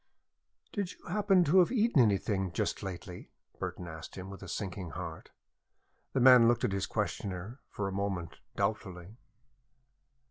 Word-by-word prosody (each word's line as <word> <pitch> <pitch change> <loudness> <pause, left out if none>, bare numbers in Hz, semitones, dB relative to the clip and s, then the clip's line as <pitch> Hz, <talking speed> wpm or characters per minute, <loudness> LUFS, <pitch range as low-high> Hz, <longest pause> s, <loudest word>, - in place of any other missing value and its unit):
"Do 205 - 0
you 185 - -7
happen 195 -1 +4
to 175 +4 +5
have 180 - +4
eaten 230 - +4
anything 100 -3 +1
just - - -1
lately?" 90 -1 -7 0.3
Burton 90 - -5
asked 80 -1 -9
him, 95 +1 -7
with 100 - -10
a - - -8
sinking 95 -3 -4
heart. 80 -3 -7 0.8
The 135 - +1
man 125 -2 +8
looked 120 0 +2
at - - +2
his 100 0 -1
questioner, 100 +6 -3
for 100 - -3
a - - -3
moment, 95 -4 -3 0.2
doubtfully. 100 -1 -3
100 Hz, 150 wpm, -31 LUFS, 90-130 Hz, 0.8 s, man